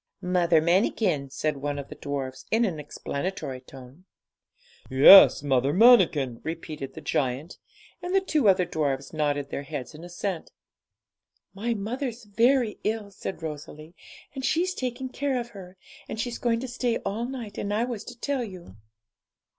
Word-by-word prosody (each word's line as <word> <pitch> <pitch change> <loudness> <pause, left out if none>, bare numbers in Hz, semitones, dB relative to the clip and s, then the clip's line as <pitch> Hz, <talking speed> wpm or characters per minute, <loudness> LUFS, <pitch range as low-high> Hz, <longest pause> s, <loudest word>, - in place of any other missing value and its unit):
'Mother 175 -3 +2
Manikin,' 170 -4 +1
said 150 +2 -2
one 145 +1 -3
of 140 -1 -6
the - - -7
dwarfs, 135 -2 -5
in 230 +2 +3
an 170 -7 -3
explanatory 140 -1 -5
tone. 135 +6 -14 0.8
'Yes, 145 +5 +9
Mother 135 -1 +2
Manikin,' 175 - +5
repeated 155 -4 -6
the 160 - -8
giant, 140 +1 -2 0.4
and 360 +2 -2
the - - +6
two 305 - +2
other 185 -1 +4
dwarfs 145 -5 -2
nodded 145 -2 -1
their - - -3
heads 135 0 -6
in 155 +2 -11
assent. 175 0 -4 1.0
'My 230 +4 -2
mother's 240 +3 -4
very 230 +2 +2
ill,' 215 -1 -2
said 190 -3 -7
Rosalie, 155 +1 -8 0.4
'and 265 -2 -6
she's 355 +7 +1
taking 255 -3 -4
care 270 0 -1
of 240 0 -6
her; 190 -4 -12 0.3
and 220 - -5
she's 240 +1 -3
going 230 -1 0
to 260 - -4
stay 245 -1 -1
all 210 +4 -2
night, 240 -5 -6
and 205 - -3
I 215 +3 +1
was 240 -4 -4
to 245 -1 -10
tell 280 -2 -1
you.' 180 - -10
185 Hz, 160 wpm, -26 LUFS, 145-235 Hz, 1.0 s, Yes